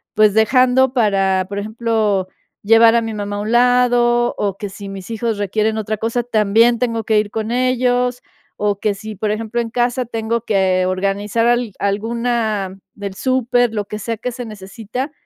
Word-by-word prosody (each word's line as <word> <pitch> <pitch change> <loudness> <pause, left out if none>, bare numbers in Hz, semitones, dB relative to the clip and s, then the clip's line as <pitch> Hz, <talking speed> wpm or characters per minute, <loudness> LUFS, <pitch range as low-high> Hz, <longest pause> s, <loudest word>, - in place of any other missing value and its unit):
pues, 215 -1 +4
dejando 255 +3 +4
para, 195 -5 +2
por 200 0 -3
ejemplo, 215 -3 -1 0.4
llevar 225 +2 +6
a 235 - +3
mi 225 -1 -4
mamá, 205 0 -4
a - - -3
un 215 +2 -3
lado, 240 -1 +3
o 200 -2 -1
que 205 0 -5
si 200 +1 -9
mis 195 +1 -8
hijos 225 -1 -2
requieren 215 +2 0
otra 215 0 -3
cosa, 230 +3 -1
también, 225 +1 +3
tengo 230 -2 -1
que 220 -1 +2
ir 210 -1 -2
con 220 0 -3
ellos, 250 0 +1 0.4
o 205 -1 -1
que 210 -1 0
si, 215 +1 -8
por 210 +2 -2
ejemplo, 225 +2 -3
en 230 -1 -5
casa 245 +1 0
tengo 230 0 -2
que 190 -3 +2
organizar 200 +4 0
al 240 -4 +1
alguna 215 -2 -1 0.2
del 200 -1 -7
súper, 245 -2 +1
lo 210 -1 -2
que 210 - -6
sea 230 +1 -3
que 250 +3 -4
se 245 0 -7
necesita. 220 +6 -6
220 Hz, 180 wpm, -18 LUFS, 205-240 Hz, 0.4 s, llevar